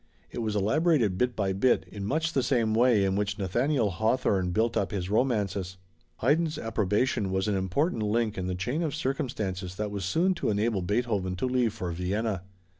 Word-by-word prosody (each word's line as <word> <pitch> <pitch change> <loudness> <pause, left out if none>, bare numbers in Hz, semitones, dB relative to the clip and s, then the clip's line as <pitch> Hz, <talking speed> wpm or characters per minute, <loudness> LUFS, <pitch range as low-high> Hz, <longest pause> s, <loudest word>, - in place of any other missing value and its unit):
It - - -5
was 110 -2 -2
elaborated 120 - +2
bit 125 -1 +1
by 95 -2 0
bit 110 +7 +2
in 100 -1 -6
much 160 +4 0
the 135 - +2
same 120 -5 +1
way 115 -3 +4
in 95 0 +1
which 100 0 -1
Nathaniel 115 +4 +1
Hawthorne 105 -2 +1
built 110 +6 +1
up 100 - 0
his 95 -2 -3
romances. 100 -6 0 0.4
Haydn's 155 +5 +2
approbation 105 -2 0
was 95 +2 0
an 105 - +1
important 110 - 0
link 110 +1 0
in 95 -1 -3
the 90 - -2
chain 120 - -2
of 155 -4 -1
circumstances 100 - -3
that 105 +1 -3
was 100 -1 -4
soon 165 - +2
to 175 - -2
enable 105 -1 +1
Beethoven 100 -1 -1
to 95 - -2
leave 125 -3 +1
for 90 -1 -3
Vienna. 95 +3 -2
105 Hz, 190 wpm, -28 LUFS, 95-125 Hz, 0.4 s, way